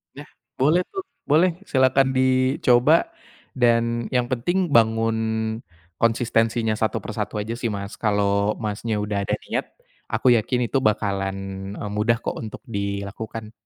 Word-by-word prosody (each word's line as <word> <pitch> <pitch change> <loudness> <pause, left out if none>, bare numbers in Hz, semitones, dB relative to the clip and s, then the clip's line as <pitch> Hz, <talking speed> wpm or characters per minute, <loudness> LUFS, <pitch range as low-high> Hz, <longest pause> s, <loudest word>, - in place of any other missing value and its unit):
Ya, 145 +2 -9 0.4
boleh 155 +6 +4
tuh, 390 - -3 0.2
boleh, 160 +5 +4 0.2
silahkan 130 0 +4
dicoba 130 - +3 0.5
dan 115 -1 +2
yang 125 -1 +1
penting 175 +9 0
bangun 115 -3 +3 0.8
konsistensinya 115 -1 +1
satu 110 +1 0
per 110 - -7
satu 105 0 -2
aja 110 +3 -4
sih 120 -1 -2
Mas. 100 0 -5
Kalau 100 -1 +1
Masnya 110 +1 -2
udah 100 -1 -2
ada - - -1
niat, - - -2 0.4
aku 110 +3 0
yakin 120 +2 -1
itu - - +1
bakalan, 100 -2 0 0.4
eee, 105 - -5
mudah 115 +2 +2
kok - - -3
untuk 110 -2 -7
dilakukan. 100 +2 -5
115 Hz, 135 wpm, -23 LUFS, 105-130 Hz, 0.8 s, boleh